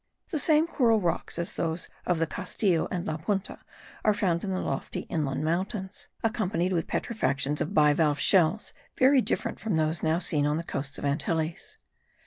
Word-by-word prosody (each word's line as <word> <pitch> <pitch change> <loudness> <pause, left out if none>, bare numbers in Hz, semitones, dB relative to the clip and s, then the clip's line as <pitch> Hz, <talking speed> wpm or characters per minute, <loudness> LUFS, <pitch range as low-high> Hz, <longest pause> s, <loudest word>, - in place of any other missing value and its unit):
The 310 - 0
same 310 +1 +4
coral 235 -9 +3
rocks 175 -3 -2
as 170 0 -2
those 165 +1 -2 0.2
of 180 - +2
the 165 - +1
Castillo 185 0 0
and 175 -1 -3
La 155 - -2
Punta 195 +4 -3 0.4
are 215 -1 +3
found 175 -5 0
in 200 - -3
the 185 -1 -1
lofty 135 - -3
inland 150 -3 -1
mountains, 190 +4 -3 0.2
accompanied 190 -6 0
with 165 -3 -1
petrifications 145 - -1
of 155 - -2
bivalve 150 -1 +4
shells, 185 +4 +3 0.2
very 265 +1 +5
different - - -2
from 215 -5 -1
those 160 +1 0
now 160 +1 +2
seen 155 -5 +1
on 150 +1 +1
the 165 - -3
coasts 140 -3 -5
of - - -8
the 140 - +1
Antilles. 160 +2 -2
170 Hz, 180 wpm, -27 LUFS, 155-205 Hz, 0.4 s, very